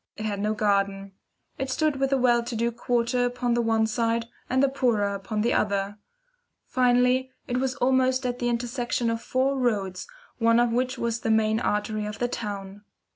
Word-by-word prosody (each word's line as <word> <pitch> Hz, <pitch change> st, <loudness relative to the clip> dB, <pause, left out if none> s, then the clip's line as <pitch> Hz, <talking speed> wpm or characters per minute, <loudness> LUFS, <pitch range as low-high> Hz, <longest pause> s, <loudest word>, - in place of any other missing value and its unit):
It 215 Hz, -, -4 dB
had 205 Hz, -2 st, -2 dB
no 210 Hz, +1 st, 0 dB
garden. 200 Hz, -2 st, 0 dB, 0.5 s
It 265 Hz, 0 st, -2 dB
stood 300 Hz, +1 st, +1 dB
with 270 Hz, 0 st, +1 dB
the 275 Hz, -, +2 dB
well 245 Hz, -2 st, +3 dB
to 235 Hz, 0 st, -5 dB
do 235 Hz, +1 st, 0 dB
quarter 240 Hz, +1 st, 0 dB
upon 245 Hz, 0 st, 0 dB
the 240 Hz, -, +2 dB
one 225 Hz, -1 st, +2 dB
side, 230 Hz, +1 st, 0 dB, 0.2 s
and 260 Hz, +2 st, +2 dB
the -, -, +5 dB
poorer 235 Hz, -7 st, +1 dB
upon 200 Hz, +2 st, -3 dB
the 235 Hz, +3 st, +1 dB
other. 200 Hz, 0 st, 0 dB, 0.7 s
Finally, 250 Hz, +1 st, +2 dB, 0.2 s
it 245 Hz, -, -1 dB
was 260 Hz, -1 st, -1 dB
almost 260 Hz, 0 st, +2 dB
at 245 Hz, 0 st, -2 dB
the 240 Hz, -, 0 dB
intersection 240 Hz, 0 st, -1 dB
of 230 Hz, 0 st, -3 dB
four 265 Hz, +2 st, 0 dB
roads, 205 Hz, -, -1 dB, 0.3 s
one 230 Hz, 0 st, +4 dB
of 240 Hz, -1 st, +3 dB
which 255 Hz, +2 st, 0 dB
was 235 Hz, -1 st, -2 dB
a -, -, 0 dB
main 220 Hz, 0 st, +3 dB
artery 210 Hz, -1 st, -1 dB
of 210 Hz, +1 st, -6 dB
the 245 Hz, -, 0 dB
town. 200 Hz, -4 st, -6 dB
235 Hz, 190 wpm, -26 LUFS, 215-250 Hz, 0.7 s, the